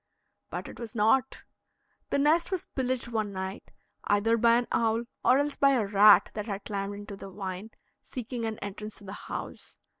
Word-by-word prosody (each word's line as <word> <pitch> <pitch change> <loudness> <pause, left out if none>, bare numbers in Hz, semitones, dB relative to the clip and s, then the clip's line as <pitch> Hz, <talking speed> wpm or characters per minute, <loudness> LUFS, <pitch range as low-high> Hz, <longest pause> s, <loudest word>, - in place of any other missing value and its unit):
But - - -5
it - - -10
was 235 -1 -7
not; 235 +5 +2 0.7
the - - +1
nest 310 +4 +3
was 375 -3 -2
pillaged 255 -2 -1
one 215 -3 -1
night, 190 +1 -6 0.4
either 205 +3 +3
by 230 0 +5
an 240 0 +1
owl, 225 0 +1 0.2
or 255 - +5
else 285 0 0
by 275 -1 +4
a 235 -5 +2
rat 205 +1 +6
that 210 0 -4
had 200 -1 -4
climbed 200 -1 -3
into 205 0 -8
the 195 - -9
vine, 190 +1 -6 0.3
seeking 245 -1 -6
an 220 -1 -3
entrance 210 +1 -6
to - - -14
the 195 0 -8 0.2
house. - - -7
220 Hz, 185 wpm, -28 LUFS, 205-245 Hz, 0.7 s, rat